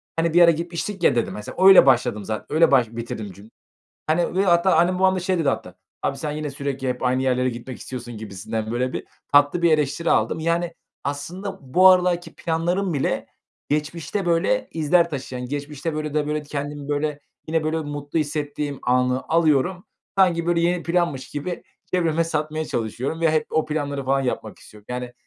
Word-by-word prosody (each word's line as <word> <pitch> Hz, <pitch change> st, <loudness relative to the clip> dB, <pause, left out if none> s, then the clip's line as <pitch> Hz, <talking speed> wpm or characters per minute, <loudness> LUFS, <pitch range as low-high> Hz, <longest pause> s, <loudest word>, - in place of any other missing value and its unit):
"Hani 165 Hz, 0 st, 0 dB
bir 175 Hz, -, +6 dB
ara 170 Hz, -1 st, +8 dB
gitmiştik 170 Hz, +3 st, -4 dB
ya." -, -, +4 dB
dedim. 120 Hz, -, 0 dB
Mesela, 105 Hz, -, -2 dB
öyle 195 Hz, -6 st, +9 dB
başladım 120 Hz, -5 st, +2 dB
zate 110 Hz, +1 st, -4 dB
öyle 165 Hz, -1 st, +5 dB
baş 125 Hz, -5 st, +4 dB
bitirdim 115 Hz, -3 st, -6 dB
cüm 100 Hz, +4 st, -15 dB, 0.6 s
Hani 170 Hz, +3 st, +1 dB
ve 195 Hz, +1 st, +2 dB
hatta 175 Hz, +1 st, +4 dB
annem 175 Hz, +3 st, +3 dB
babam 190 Hz, 0 st, +4 dB
da -, -, -1 dB
şey 185 Hz, 0 st, 0 dB
dedi 145 Hz, -4 st, +2 dB
hatta, 90 Hz, -8 st, -4 dB, 0.3 s
"abi 135 Hz, -, -1 dB
sen 150 Hz, +1 st, -3 dB
yine 150 Hz, -1 st, -4 dB
sürekli 135 Hz, -1 st, -3 dB
hep 125 Hz, +1 st, -3 dB
aynı 130 Hz, +1 st, +1 dB
yerlere 130 Hz, 0 st, +1 dB
gitmek 120 Hz, +1 st, -7 dB
istiyorsun," 120 Hz, -3 st, -7 dB
gibisinden 110 Hz, +1 st, -5 dB
böyle 125 Hz, +2 st, -1 dB
bir, -, -, -4 dB, 0.3 s
tatlı 145 Hz, +4 st, +5 dB
bir 170 Hz, -1 st, +4 dB
eleştiri 155 Hz, +2 st, +1 dB
aldım. 160 Hz, -, +1 dB
Yani 170 Hz, +1 st, 0 dB, 0.3 s
aslında 180 Hz, +8 st, -5 dB
bu 185 Hz, +1 st, +7 dB
aralarki 180 Hz, -2 st, +2 dB
planlarım 175 Hz, +2 st, -1 dB
bile 140 Hz, -, -1 dB, 0.4 s
geçmişte 155 Hz, +5 st, -2 dB
böyle, 175 Hz, +10 st, +1 dB
izler 170 Hz, +2 st, +2 dB
taşıyan... 130 Hz, -3 st, -5 dB
Geçmişte 145 Hz, +3 st, -4 dB
böyle 155 Hz, -1 st, -3 dB
de 150 Hz, -1 st, 0 dB
böyle, 150 Hz, 0 st, -1 dB
kendimi, 145 Hz, 0 st, -5 dB
böyle, 145 Hz, 0 st, -1 dB, 0.3 s
yine, 160 Hz, 0 st, 0 dB
böyle, 155 Hz, +1 st, 0 dB
mutlu 145 Hz, +1 st, -3 dB
hissettiğim 145 Hz, -1 st, -3 dB
anı 125 Hz, +1 st, +2 dB
alıyorum, 165 Hz, +2 st, +2 dB, 0.3 s
sanki, 170 Hz, -3 st, +3 dB
böyle, 170 Hz, -1 st, +2 dB
yeni 175 Hz, 0 st, +1 dB
planmış 170 Hz, -7 st, -1 dB
gibi 150 Hz, +5 st, -5 dB, 0.3 s
çevreme 165 Hz, -2 st, +2 dB
satmaya 155 Hz, -1 st, -2 dB
çalışıyorum 125 Hz, +8 st, -3 dB
ve 165 Hz, -1 st, +4 dB
hep 155 Hz, -, +1 dB
o 160 Hz, -, +1 dB
planları 145 Hz, -3 st, -3 dB
falan 135 Hz, +1 st, +2 dB
yapmak 110 Hz, -4 st, -4 dB
istiyorum. 105 Hz, -1 st, -16 dB
Yani, 125 Hz, 0 st, -4 dB
150 Hz, 185 wpm, -23 LUFS, 130-170 Hz, 0.6 s, öyle